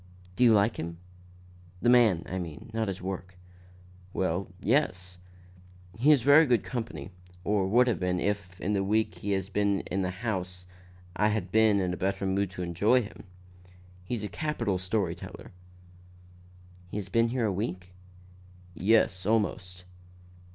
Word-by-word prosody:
"Do 125 - +2
you 120 - +7
like 105 +1 +3
him? 85 +1 -5 0.8
the 120 - -1
man, 115 -8 +5
I 95 - -3
mean, 85 +5 -8
not 110 -1 -1
his 95 -2 -5
work." 95 -1 -6 0.8
"Well 95 0 -1
yes. 95 -8 0 0.8
He 140 +6 +4
is 140 -6 +4
very 145 +3 +7
good 120 -3 +2
company, 110 - -5 0.3
or 100 -2 +1
would 120 +6 +5
have 120 -3 0
been 90 0 0
if, 100 -3 -3
in 105 - -1
the 100 -1 +1
week 110 +3 +1
he 100 0 -1
has 95 0 -2
been 100 -1 +1
in 95 +2 -3
the 90 - -1
house, 90 -3 -4 0.5
I 105 +3 +3
had 105 -4 -1
been 110 -1 +4
in 90 -1 -1
better 95 +1 -1
mood 95 0 0
to 90 -1 -6
enjoy 105 +9 +2
him. 105 - -11 0.8
He's 110 +3 -4
a - - -2
capital 115 -10 -2
story 90 -1 -1
teller." - - -10 1.4
"He - - -5
has 100 -2 -4
been 115 +3 +3
here 120 0 -1
a 105 - 0
week?" 90 -2 -4 0.8
"Yes, 95 -1 +2
or 110 - +4
almost." 90 -4 -2
100 Hz, 160 wpm, -28 LUFS, 90-110 Hz, 1.4 s, you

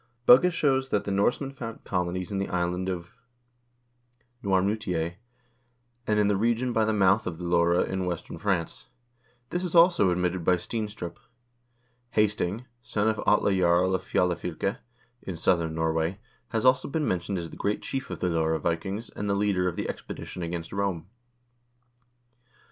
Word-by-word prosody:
Bugge 135 +9 +8
shows 135 -5 +1
that 105 - +1
the 100 - -3
Norsemen 120 +7 +1
founded 115 -4 -8
colonies 90 0 -2
in 100 - -1
the 100 - -2
island 90 +1 -1
of 85 -2 -5 1.3
Noirmoutier, 95 -3 0 0.9
and 105 0 +2
in 105 - +4
the 105 - +2
region 120 +4 +1
by 110 -1 +3
the 110 - +1
mouth 100 0 +3
of 85 -2 -4
the 90 - -8
Loire 85 0 +3
in 95 -1 -2
western 90 -2 -5
France. 95 -5 -2 0.6
This 175 +1 -1
is 180 -1 -3
also 170 - +6
admitted 90 0 0
by 90 +2 +4
Steenstrup.1 105 -2 -5 1.0
Hasting, 105 +1 +1 0.2
son 105 -2 0
of 110 - -1
Atle 100 -1 +4
Jarl 90 0 +3
of 95 - 0
Fjalafylke, 90 +2 -1 0.4
in 95 - -5
southern 85 -1 +1
Norway, 80 +3 0 0.3
has 110 +1 -2
already 130 +1 +4
been 150 +1 -1
mentioned 95 +2 -1
as 85 -2 -5
the - - -9
great 105 +1 -2
chief 135 -1 -4
of - - -6
the 90 - +1
Loire 80 -1 +1
Vikings 90 +8 -3
and 105 - -4
the 100 - +2
leader 100 -3 +1
of 90 - -2
the - - -3
expedition 90 - -7
against 85 0 -4
Rome. 95 -3 -2
95 Hz, 160 wpm, -27 LUFS, 85-110 Hz, 1.3 s, Bugge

